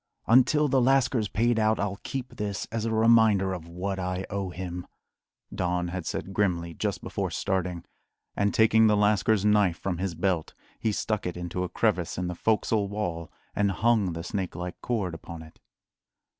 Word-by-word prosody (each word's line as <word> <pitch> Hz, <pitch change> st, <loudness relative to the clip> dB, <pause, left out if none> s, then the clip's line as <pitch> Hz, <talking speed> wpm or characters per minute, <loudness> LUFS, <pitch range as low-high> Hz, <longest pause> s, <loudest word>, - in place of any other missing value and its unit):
"Until 130 Hz, +5 st, +5 dB
the 135 Hz, -1 st, +3 dB
lascar's 130 Hz, -3 st, +3 dB
paid 115 Hz, +2 st, +1 dB
out, 110 Hz, 0 st, +2 dB
I'll 100 Hz, 0 st, -2 dB
keep 130 Hz, -2 st, -6 dB
this 105 Hz, -2 st, -3 dB
as 115 Hz, 0 st, -2 dB
a 115 Hz, -, -1 dB
reminder 110 Hz, -4 st, +4 dB
of 85 Hz, -3 st, -7 dB
what 95 Hz, +3 st, -4 dB
I 90 Hz, +1 st, -2 dB
owe 100 Hz, -2 st, -2 dB
him," 90 Hz, 0 st, -6 dB, 0.7 s
Don 90 Hz, -1 st, -1 dB
had 90 Hz, -1 st, -5 dB
said 95 Hz, -, -4 dB
grimly, 85 Hz, -5 st, 0 dB
just -, -, -3 dB
before -, -, -2 dB
starting; 90 Hz, -3 st, -2 dB, 0.5 s
and 100 Hz, 0 st, +1 dB
taking 110 Hz, 0 st, +5 dB
the 105 Hz, -1 st, +4 dB
lascars 105 Hz, 0 st, +2 dB
knife 105 Hz, -5 st, +3 dB
from 90 Hz, -1 st, -3 dB
his 95 Hz, -2 st, -2 dB
belt 85 Hz, -1 st, -1 dB, 0.2 s
he 110 Hz, -, 0 dB
stuck 105 Hz, -1 st, -2 dB
it 90 Hz, -, -5 dB
into 90 Hz, +1 st, -3 dB
a 90 Hz, -, -3 dB
crevice 95 Hz, -7 st, 0 dB
in 90 Hz, -, -1 dB
the 90 Hz, -, -2 dB
"fo'csle" 105 Hz, +1 st, +1 dB
wall, 90 Hz, -6 st, -4 dB, 0.2 s
and 100 Hz, -1 st, +2 dB
hung 105 Hz, -1 st, +2 dB
the 85 Hz, 0 st, -5 dB
snake 95 Hz, -1 st, -3 dB
like 90 Hz, +1 st, -6 dB
cord 105 Hz, -8 st, -1 dB
upon 80 Hz, 0 st, -8 dB
it. 80 Hz, -, -16 dB
100 Hz, 180 wpm, -27 LUFS, 90-110 Hz, 0.7 s, Until